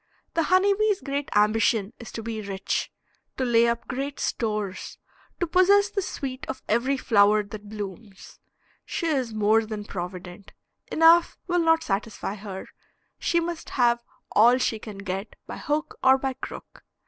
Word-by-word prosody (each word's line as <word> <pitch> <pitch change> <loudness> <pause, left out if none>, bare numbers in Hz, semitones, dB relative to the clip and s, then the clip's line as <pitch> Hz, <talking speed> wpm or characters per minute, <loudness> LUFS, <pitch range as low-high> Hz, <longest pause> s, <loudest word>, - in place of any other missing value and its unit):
The 330 - +2
honeybee's 395 +4 +3
great 280 0 -3
ambition 210 0 +2
is 235 - -9
to 225 - -5
be 220 -1 -4
rich, 195 -1 -3 0.5
to 260 - 0
lay 235 -1 +4
up 235 0 -2
great 275 +2 -4
stores, 210 -4 -3 0.4
to 350 - +1
possess 395 +4 +4
the 400 - -1
sweet 270 -7 -5
of - - -6
every 255 +5 +1
flower 210 -3 +4
that 205 0 -10
blooms. 205 -1 -8 0.4
She 345 - -4
is 270 -7 0
more 215 +1 +3
than 215 -1 -6
provident. 180 0 -7 0.4
Enough 330 +1 +5
will 355 -1 +1
not 325 -1 +3
satisfy 205 -3 -3
her, 195 -2 -7 0.5
she 340 - +2
must 340 -1 -4
have 235 -2 +2 0.3
all 240 +4 +6
she 230 -3 0
can 210 -2 -9
get 195 +1 -5
by - - -7
hook 300 +1 -2
or 265 0 +6
by 265 0 -2
crook. 260 - -10
235 Hz, 155 wpm, -25 LUFS, 210-300 Hz, 0.5 s, all